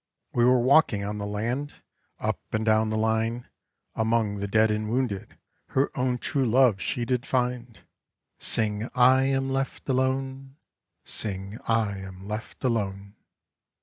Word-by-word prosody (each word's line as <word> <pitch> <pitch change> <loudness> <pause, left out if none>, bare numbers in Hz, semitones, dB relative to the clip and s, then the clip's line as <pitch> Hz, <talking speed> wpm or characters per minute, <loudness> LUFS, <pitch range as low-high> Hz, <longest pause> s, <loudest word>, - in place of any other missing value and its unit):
We 120 - +2
were 125 0 +5
walking 120 -5 +4
on 105 +1 -4
the 100 - -3
land, 120 +8 -3 0.4
Up - - -1
and 110 0 0
down 110 0 +3
the 110 - -1
line, 110 +2 0 0.5
Among 110 -2 +1
the 100 0 -3
dead 110 +2 +3
and 105 0 -2
wounded 115 -5 -2 0.3
Her 135 +2 0
own 125 -1 0
true 135 +2 -1
love 115 -4 +4
she 120 +4 -1
did 125 0 0
find. 125 -3 -2 0.6
Sing 105 +1 0
I 130 +1 +5
am 135 0 0
left 135 0 -3
alone, 135 0 -1 0.5
Sing 100 0 -3
I 110 -3 +1
am 95 0 -9
left 110 +5 -6
alone. 100 -5 -1
115 Hz, 145 wpm, -26 LUFS, 105-130 Hz, 0.6 s, were